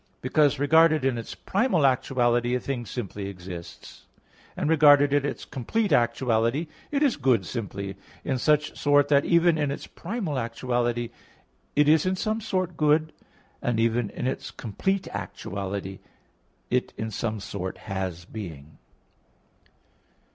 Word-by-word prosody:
Because, 145 +2 +2
regarded 155 +1 +4
in 130 -3 +1
its 115 - -7
primal 195 - +1
actuality, 120 -2 +2
a - - 0
thing 125 -3 -4
simply 100 -4 -5
exists; 90 -2 -10 0.5
and - - -1
regarded 145 -2 +6
in 145 -1 +3
its 145 - -4
complete 195 - -1
actuality, 120 +3 +2 0.2
it 290 0 +1
is 275 -5 +2
good 130 -3 +2
simply 100 -4 -5 0.3
in 130 -3 -1
such 150 +2 +2
sort 145 -1 +3
that 140 -1 +4
even 170 -1 +4
in 145 -2 +1
its 140 - -5
primal 180 - -4
actuality, 120 0 -1 0.6
it 150 0 +4
is 155 +3 +4
in 185 - +1
some 215 +3 -1
sort 185 -5 -2
good, 155 +1 +2 0.5
and 120 -2 0
even 115 -1 +1
in - - -5
its 130 - -2
complete 190 - -2
actuality, 95 0 -5 0.7
it 125 0 0
in 110 0 -3
some 110 +1 -2
sort 95 -2 -5
has 95 -4 -4
being. 80 -9 -9
130 Hz, 140 wpm, -26 LUFS, 110-155 Hz, 0.7 s, regarded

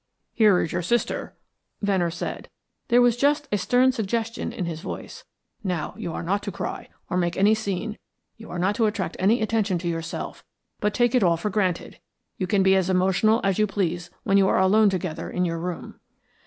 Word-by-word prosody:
"Here 210 -5 +5
is 160 - -2
your - - -1
sister," 235 +8 -1 0.5
Venner 190 -4 +2
said. 170 +1 -5 0.4
There 245 0 +5
was 240 -2 +4
just 290 +4 +1
a 205 - +2
stern 250 +6 +3
suggestion 230 0 -2
in 180 - -4
his 165 -2 -5
voice. - - -7 0.4
"Now, 180 -6 -2
you 170 - -5
are - - -4
not 200 +4 0
to 205 - -4
cry - - -5 0.2
or 180 - -2
make 175 -1 0
any 205 +3 +5
scene, 215 0 -3 0.4
you 225 - -12
are 175 - -5
not 185 +4 +1
to 225 -3 +3
attract 190 -5 -3
any 215 +4 +3
attention 215 -4 +1
to 175 +1 -4
yourself, 165 0 -4 0.4
but 210 0 0
take 240 -1 +3
it 250 - +4
all 170 -3 +3
for 205 +5 -3
granted. 185 -3 -1 0.4
You 185 - -2
can 195 0 +2
be 190 0 +5
as 190 -1 +1
emotional 190 +5 +3
as 195 0 +1
you 215 - +3
please 175 -3 -2
when 195 - +3
you 195 -1 +5
are - - +2
alone 205 +3 +5
together 185 -4 -3
in 180 0 0
your 165 -1 -2
room." 175 0 -6
195 Hz, 205 wpm, -24 LUFS, 180-220 Hz, 0.5 s, Here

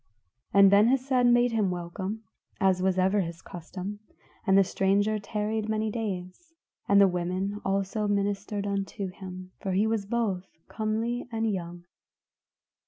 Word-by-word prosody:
And 200 -1 +7
Ben 205 +2 +6
Hesed 255 -1 +2
made 240 0 +4
him 215 -4 +1
welcome, 185 +5 -4 0.4
as 190 -1 +3
was 190 0 +1
ever 190 +2 +3
his 170 -1 -6
custom, 185 +3 -7 0.5
and 190 0 +5
the 195 - +7
stranger 200 +3 +1
tarried 215 +1 -2
many 220 0 0
days; 210 - -5 0.3
the 200 0 +7
women 185 +3 -2
also 195 +2 -1
ministered 200 0 -1
unto 200 -1 -3
him, 185 0 -9
for 195 -2 -3
he 200 +3 +3
was 220 -3 -1
both 200 -5 -1 0.2
comely 225 +3 -2
and 225 -1 0
young. 175 -1 -6
200 Hz, 140 wpm, -28 LUFS, 185-220 Hz, 0.5 s, And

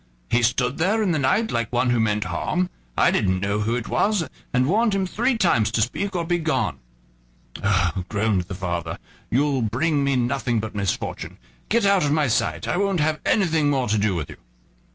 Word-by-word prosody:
He 120 - +3
stood 125 +3 +1
there 210 +6 +2
in 190 - +1
the 155 - +1
night, 200 +12 +1
like 115 -2 -1
one 125 0 +1
who 120 - +2
meant 105 -1 +1
harm. 175 - -2 0.3
I - - +4
didn't 95 -3 +1
know 100 +2 -1
who 110 +3 0
it 120 -2 -4
was, 205 -6 +1 0.2
and 125 +1 +2
warned 210 - +2
him 195 -1 0
three 235 +6 0
times 115 - +2
to 115 - +1
speak 195 - -3
or 170 -1 -1
begone." 155 - -1 0.8
"Oh!" 95 -2 +1
groaned 100 -3 0
the 95 - -7
father, 85 -3 -3 0.3
"you'll 140 0 +1
bring 140 +7 0
me 140 -1 +1
nothing 120 -1 0
but 110 0 -5
misfortune; 100 -2 -3 0.3
get 230 -1 +2
out 200 -3 +4
of 145 - +1
my 150 -1 +2
sight, 80 -8 0
I - - 0
won't 195 -2 +1
have 155 0 +1
anything 160 -7 +2
more 135 -3 +1
to 110 - +2
do 100 -2 +1
with 75 -5 -4
you." - - -11
125 Hz, 200 wpm, -23 LUFS, 105-170 Hz, 0.8 s, I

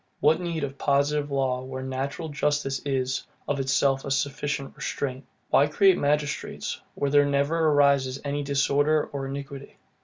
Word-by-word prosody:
What 160 +3 +3
need 170 -3 -3
of 140 0 -5
positive 145 +1 +1
law 135 -2 0
where 130 0 -6
natural 135 +5 -4
justice 145 -2 0
is, 130 -2 -1 0.2
of 145 -1 -1
itself, 135 0 +2
a - - -5
sufficient 140 +1 -2
restraint? 135 -1 -4 0.3
Why 140 - +5
create 190 +5 +4
magistrates, 145 0 -1
where 140 - -1
there 145 0 +6
never 145 +3 +1
arises 140 -3 +3
any 145 +1 -1
disorder 145 +2 +2
or 135 -1 -3
iniquity? 140 0 -7
140 Hz, 150 wpm, -26 LUFS, 135-145 Hz, 0.3 s, there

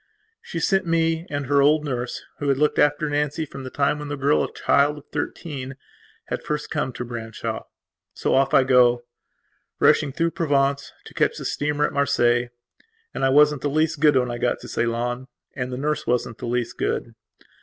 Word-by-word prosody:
She 170 - -5
sent 190 +2 +1
me 165 0 +1
and 145 -1 -3
her 140 +1 +3
old 150 +2 +4
nurse, 125 -3 -3 0.2
who 145 - -1
had 135 - +2
looked 150 +1 +1
after 145 +1 +3
Nancy 150 +2 -1
from 135 -2 -9
the 130 - -6
time 140 +2 0
when 150 - -6
the 145 - -3
girl, 140 +2 +2
a - - -4
child 145 +1 +2
of 145 - -11
thirteen, 135 -5 -5 0.5
had - - -4
first 150 0 -4
come 145 -4 -1
to 125 - -5
Branshaw. 115 -2 -5 0.5
So - - 0
off 135 0 +3
I 135 - +5
go, 125 -2 +4 0.8
rushing 140 - +4
through 165 +5 0
Provence, 140 -4 0
to - - -12
catch - - +1
the - - -6
steamer 145 0 0
at - - -3
Marseilles. 120 -3 +2 0.6
And - - -3
I 135 - +4
wasn't 150 0 +4
the 145 - 0
least 155 +1 +1
good 150 -2 +5
when 125 -2 +2
I 120 - -5
got 120 0 0
to - - -9
Ceylon; 120 +2 -2 0.3
and 125 -2 -3
the 125 - -4
nurse 150 +2 -2
wasn't 120 -2 -1
the - - -5
least 120 -1 -2
good. 115 - -2
140 Hz, 195 wpm, -23 LUFS, 125-150 Hz, 0.8 s, I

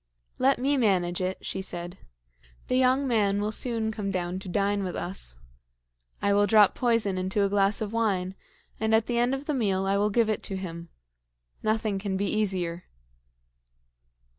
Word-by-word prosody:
"Let 270 +1 +4
me 275 +3 +1
manage 185 -7 +1
it," 185 +1 -3
she 190 - -3
said. 175 0 -6 0.7
"The 255 - +2
young 260 +2 +3
man 205 -4 +2
will 210 +1 -1
soon 225 -1 -1
come 210 -2 -4
down 180 -1 -2
to 190 - -8
dine 200 +1 0
with 180 -2 -4
us. 175 - -5 0.9
I 200 - +3
will 205 0 +4
drop 210 -2 +6
poison 230 -6 +1
into 190 +2 0
a - - 0
glass 200 +1 +2
of 215 0 -3
wine, 195 -5 0 0.5
and 220 0 +2
at 220 0 +2
the 240 -1 0
end 245 +2 +2
of 270 +2 -7
the 300 - -1
meal 195 -7 0
I 195 +1 +2
will 205 +1 +2
give 230 +2 +2
it 215 - -1
to 195 - -4
him. 170 -3 -7 0.7
Nothing 215 -2 0
can 190 -1 -2
be 200 - 0
easier." 185 -5 -1
205 Hz, 180 wpm, -27 LUFS, 190-225 Hz, 0.9 s, drop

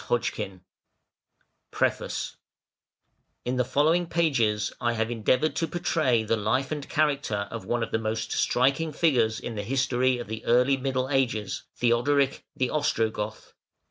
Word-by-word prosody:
PREFACE - - -1 1.1
In 125 +1 -1
the 125 - +3
following 155 +7 +2
pages 120 -12 +1
I 120 0 +1
have 110 0 -1
endeavoured 125 +6 +1
to 165 - 0
portray 150 -8 +1
the 110 +1 +1
life 110 +6 0
and 150 -2 -4
character 140 -9 0
of 115 - -6
one 120 -1 0
of - - -5
the 110 - +1
most 110 0 -3
striking 140 +6 +2
figures 120 -9 +2
in 120 - -5
the 105 - -3
history 130 +2 +1
of 120 - -5
the 110 +1 -6
Early 125 +3 +4
Middle 130 0 -1
Ages, 115 -7 0
Theodoric 130 +4 +2
the 130 -1 0
Ostrogoth. 110 -7 -1
125 Hz, 140 wpm, -27 LUFS, 110-140 Hz, 1.1 s, Early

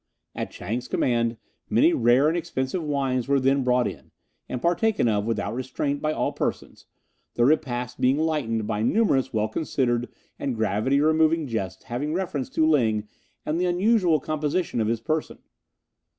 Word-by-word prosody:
At - - -4
Chang's 120 +7 -5
command 115 -2 0 0.3
many 120 +11 +4
rare 120 +4 +4
and 160 - +1
expensive 170 -2 -2
wines 135 -4 -1
were 140 0 +3
then 135 +1 +2
brought 125 -1 +2
in, - - -8 0.4
and 125 - -3
partaken 175 - +1
of 105 -2 +1
without 105 -2 -1
restraint 140 +3 -2
by 155 - 0
all - - -1
persons, - - -4 0.5
the 120 - +3
repast 125 -4 0
being 130 +2 +3
lightened 145 -9 -1
by 105 0 -2
numerous 135 - +2
well 110 -1 0
considered 120 -5 -1 0.3
and 135 -3 -2
gravity 110 +5 +1
removing 160 +1 +3
jests 95 -7 -4
having 145 +6 -3
reference 170 -8 -2
to 160 - +1
Ling 110 -8 +2 0.4
and 160 +3 -1
the 180 - +2
unusual 180 -2 +3
composition 155 -2 -1
of 110 - 0
his 115 0 -1
person. 155 -1 -2
130 Hz, 160 wpm, -25 LUFS, 120-155 Hz, 0.5 s, many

